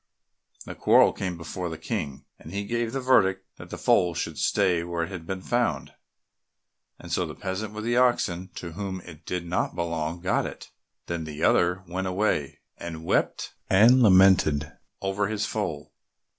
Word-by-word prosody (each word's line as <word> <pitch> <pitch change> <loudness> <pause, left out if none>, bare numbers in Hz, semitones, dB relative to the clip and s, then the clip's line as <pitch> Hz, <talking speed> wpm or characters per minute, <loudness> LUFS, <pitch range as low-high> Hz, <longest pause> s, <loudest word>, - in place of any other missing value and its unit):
The - - -6
quarrel - - +5
came 90 -2 -4
before 85 +2 -5
the 80 - -6
King, 80 -5 -4
and 80 - -11
he 100 +2 -3
give 120 +1 -1
the 135 - -2
verdict 95 -7 +3
that - - -11
the - - -6
foal 90 -2 +2
should - - -4
stay 90 -4 +2
where 85 -1 -2
it 85 - -5
had 85 -3 -7
been 95 -1 -4
found, 120 - -1 1.0
and - - -11
so - - +1
the - - -6
peasant 100 +3 -4
with 105 - -5
the 120 +1 0
oxen, 95 -8 +2
to 85 - -6
whom 95 +1 -5
it 85 -2 -14
did 90 -1 -3
not 85 -1 -1
belong, 85 -1 -2
got 90 - 0
it. - - -10 0.3
Then 85 -2 -4
the 75 0 -6
other 90 +2 +3
went 95 +2 -3
away, 90 -7 -1 0.2
and 80 -1 -7
wept - - 0 0.2
and 115 +7 +6
lamented 95 -8 +5 0.3
over 95 +1 0
his 105 0 -1
foal. - - -4
95 Hz, 175 wpm, -26 LUFS, 85-100 Hz, 1.0 s, and